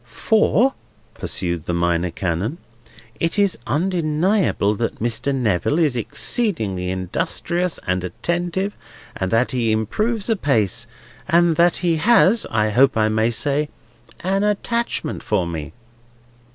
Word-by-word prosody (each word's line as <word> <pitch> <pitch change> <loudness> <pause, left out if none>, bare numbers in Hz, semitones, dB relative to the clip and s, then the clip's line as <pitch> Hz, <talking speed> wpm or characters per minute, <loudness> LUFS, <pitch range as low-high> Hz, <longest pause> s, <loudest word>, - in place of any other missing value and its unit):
"—For," 220 - +2 0.4
pursued 85 -2 -3
the 85 - -1
Minor 85 0 +1
Canon, 95 - -2 0.6
"it 165 +4 0
is 200 -2 +3
undeniable 165 - +1
that 115 +2 -3
Mr. 120 +4 -1
Neville 115 - +1
is 155 -7 +2
exceedingly 110 - -1
industrious 165 - -2
and 90 0 -1
attentive, 175 - -2 0.4
and 95 - -2
that 115 +5 +2
he 120 -3 0
improves 210 - -1
apace, 115 - +1 0.4
and 170 -1 +4
that 175 0 +4
he 165 -2 +2
has—I 185 - +3
hope 130 +3 +4
I 110 0 +3
may 110 +1 +2
say—an 145 - -3
attachment 210 -4 -1
to 105 -5 +2
me." 80 -3 -5
130 Hz, 115 wpm, -21 LUFS, -, 0.6 s, and